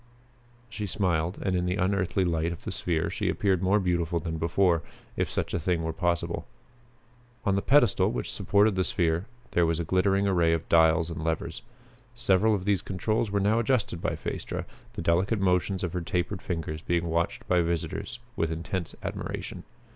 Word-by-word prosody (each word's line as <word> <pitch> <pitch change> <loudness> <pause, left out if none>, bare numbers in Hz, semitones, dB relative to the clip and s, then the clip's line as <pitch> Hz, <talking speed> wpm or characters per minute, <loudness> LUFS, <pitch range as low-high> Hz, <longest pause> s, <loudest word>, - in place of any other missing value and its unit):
She 110 -2 -5
smiled, 90 -3 0
and 95 -2 +1
in 90 0 0
the 90 - 0
unearthly 95 -1 +1
light 85 -1 0
of 85 - -8
the - - -4
sphere 80 -3 -1
she - - -1
appeared 95 -4 +1
more 95 +3 +3
beautiful 85 -3 0
than 80 0 -4
before, 85 0 +2 0.3
if - - 0
such - - -2
a - - +1
thing 85 +1 0
were 80 0 -2
possible. 85 +2 -1 1.0
On 100 - +3
the 100 - +1
pedestal 140 -1 +4
which - - -3
supported 105 +1 +3
the 95 0 +1
sphere 85 +2 0 0.2
there 85 - +3
was 85 0 0
a - - 0
glittering 95 +3 +2
array 85 -4 +3
of 85 0 -2
dials 80 0 +4
and 80 -1 -5
levers. 80 0 -2 0.5
Several 110 -2 +3
of 95 -2 -4
these 100 -4 +2
controls 110 +4 -1
were 100 0 +1
now 105 +3 +3
adjusted 115 -8 0
by - - -1
Phaestra, - - -4 0.3
the - - -5
delicate 95 +6 +2
motions 95 +1 +1
of 90 -2 -2
her 90 - -1
tapered 90 +3 -2
fingers 80 -3 -4
being 85 0 0
watched 85 0 -1
by 90 - +3
the - - +3
visitors 85 +7 -3 0.2
with 80 -8 0
intense 85 +2 -4
admiration. - - -5
90 Hz, 185 wpm, -28 LUFS, 85-100 Hz, 1.0 s, pedestal